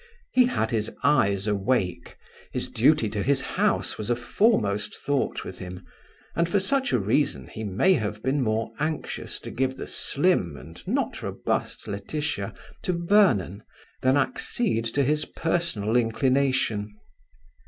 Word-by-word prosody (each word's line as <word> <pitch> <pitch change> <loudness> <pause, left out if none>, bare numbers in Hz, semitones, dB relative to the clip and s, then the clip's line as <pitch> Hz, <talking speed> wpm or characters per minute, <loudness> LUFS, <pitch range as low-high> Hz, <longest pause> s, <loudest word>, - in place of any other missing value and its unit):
He 250 -1 +5
had 175 - -1
his 110 -2 0
eyes 100 -9 +3
awake. 100 -4 -1 0.3
His - - -3
duty 130 +1 +4
to 105 -1 -2
his 140 +4 +2
House - - 0
was 105 +1 -4
a 120 - +3
foremost 115 - +1
thought 140 -1 -1
with 90 - -8
him, 90 0 -8 0.5
and 170 0 +1
for 200 - +3
such 270 +7 +1
a - - +4
reason 100 - +1
he 110 - -7
may 105 - +3
have 105 - -2
been 135 +2 +1
more 110 -1 0
anxious 155 +1 -3
to - - -7
give 130 +1 -1
the - - -5
slim 140 - +1
and 80 +3 -11
not - - -1
robust - - -3
Laetitia 100 +2 -3 0.3
to 180 - 0
Vernon 170 - +3 0.4
than 130 +2 +4
accede 205 - 0
to 135 +5 +1
his 150 +3 +1
personal 165 -11 -1
inclination. 120 -3 +1
120 Hz, 145 wpm, -26 LUFS, 105-150 Hz, 0.5 s, He